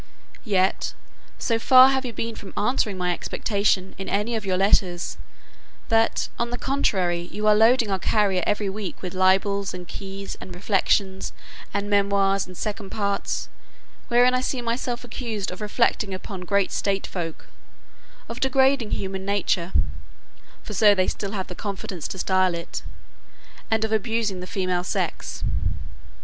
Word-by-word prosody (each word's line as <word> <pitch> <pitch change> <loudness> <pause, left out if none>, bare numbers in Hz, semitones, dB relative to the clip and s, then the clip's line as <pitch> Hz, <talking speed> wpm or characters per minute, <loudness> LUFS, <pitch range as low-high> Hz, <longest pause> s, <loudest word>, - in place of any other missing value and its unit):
Yet, 190 -4 +1 0.4
so 230 -1 0
far 255 +2 +8
have 265 -1 0
you - - -4
been 230 0 -3
from 195 - -10
answering 210 -3 +1
my 180 -1 +1
expectation 200 0 0
in 195 - -4
any 210 +4 0
of 215 -3 -3
your 185 -1 +1
letters; 185 -2 +2 0.7
that 225 0 +3
on 235 0 0
the 245 - -3
contrary 180 -10 0
you 210 +1 -3
are 215 - +7
loading 225 +1 +4
our 190 - 0
carrier 195 -2 +2
every 205 0 +1
week 195 -1 -5
with 180 - -4
libels, 190 +1 +2
and 180 -1 -8
keys, 195 +1 -6
and 180 - -8
reflections, 190 0 +1 0.4
and 200 0 -2
memoirs, 200 -1 +2
and 185 -1 -11
second 205 -2 -4
parts; 200 -2 -1 0.6
wherein 245 +1 +5
I 255 - +2
see 255 0 -1
myself 240 +1 -2
accused 225 -5 -4
of 180 - -8
reflecting 210 -2 +1
upon 185 -1 -7
great 200 0 +2
state 195 -1 0
folk; 165 -3 -6 0.8
of 235 +2 -6
degrading 265 -3 +3
human 190 0 -3
nature 195 -3 0 0.9
(for 210 - -7
so 210 -1 +6
they 185 - +3
have - - 0
still 200 -1 -3
the 180 - -8
confidence 190 -3 -5
to - - -6
style 185 -1 +2
it), 170 - -5 0.9
and 220 0 +2
of 220 - -4
abusing 220 -3 0
the 180 - -7
female 185 -3 -1
sex. - - -3
200 Hz, 155 wpm, -24 LUFS, 190-225 Hz, 0.9 s, far